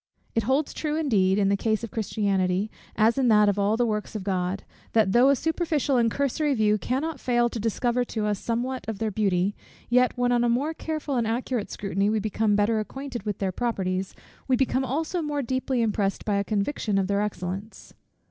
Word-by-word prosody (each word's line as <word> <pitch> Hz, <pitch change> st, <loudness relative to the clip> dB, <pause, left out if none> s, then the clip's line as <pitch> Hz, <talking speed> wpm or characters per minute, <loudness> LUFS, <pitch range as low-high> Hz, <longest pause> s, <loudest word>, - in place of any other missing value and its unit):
It 225 Hz, -, +2 dB
holds 280 Hz, +3 st, +1 dB
true, 300 Hz, -1 st, -2 dB
indeed, 205 Hz, -12 st, +2 dB
in 200 Hz, -1 st, +3 dB
the 200 Hz, -, +3 dB
case 220 Hz, +2 st, 0 dB
of 230 Hz, -, -5 dB
Christianity, 200 Hz, -2 st, 0 dB, 0.2 s
as 225 Hz, +5 st, +3 dB
in 260 Hz, -, +3 dB
that 210 Hz, -2 st, +5 dB
of 205 Hz, 0 st, +1 dB
all 205 Hz, +2 st, +2 dB
the 245 Hz, -, +2 dB
works 210 Hz, -1 st, -3 dB
of 210 Hz, -, -3 dB
God, 185 Hz, 0 st, -1 dB, 0.3 s
that 220 Hz, -4 st, +4 dB
though 245 Hz, +5 st, +5 dB
a 280 Hz, -, +5 dB
superficial 310 Hz, -1 st, 0 dB
and 230 Hz, -1 st, +3 dB
cursory 280 Hz, +3 st, 0 dB
view 215 Hz, -2 st, +2 dB
cannot 280 Hz, +6 st, -2 dB
fail 240 Hz, -1 st, +2 dB
to 235 Hz, -, -5 dB
discover 240 Hz, +3 st, 0 dB
to 220 Hz, -3 st, -3 dB
us 205 Hz, -2 st, 0 dB
somewhat 250 Hz, +3 st, -2 dB
of 220 Hz, -, -3 dB
their 220 Hz, +1 st, -1 dB
beauty; 195 Hz, -1 st, +1 dB, 0.4 s
yet, 250 Hz, +1 st, +4 dB
when 245 Hz, 0 st, +2 dB
on 240 Hz, -1 st, +3 dB
a 240 Hz, -, +2 dB
more 275 Hz, +7 st, +1 dB
careful 310 Hz, -4 st, -3 dB
and 230 Hz, -2 st, +1 dB
accurate 235 Hz, -1 st, -2 dB
scrutiny 200 Hz, 0 st, -1 dB
we 220 Hz, 0 st, +1 dB
become 215 Hz, 0 st, +1 dB
better 215 Hz, +2 st, +2 dB
acquainted 245 Hz, 0 st, -6 dB
with 205 Hz, -, -1 dB
their 195 Hz, -2 st, -1 dB
properties, 190 Hz, -4 st, -2 dB, 0.3 s
we 260 Hz, -, +3 dB
become 260 Hz, +1 st, +1 dB
also 315 Hz, +7 st, -1 dB
more 295 Hz, -2 st, -2 dB
deeply 260 Hz, 0 st, 0 dB
impressed 205 Hz, -3 st, -1 dB
by 205 Hz, -2 st, +1 dB
a 200 Hz, -, +1 dB
conviction 210 Hz, 0 st, -1 dB
of 195 Hz, -, +2 dB
their 200 Hz, +1 st, 0 dB
excellence. 195 Hz, +1 st, -5 dB
225 Hz, 205 wpm, -26 LUFS, 200-260 Hz, 0.4 s, that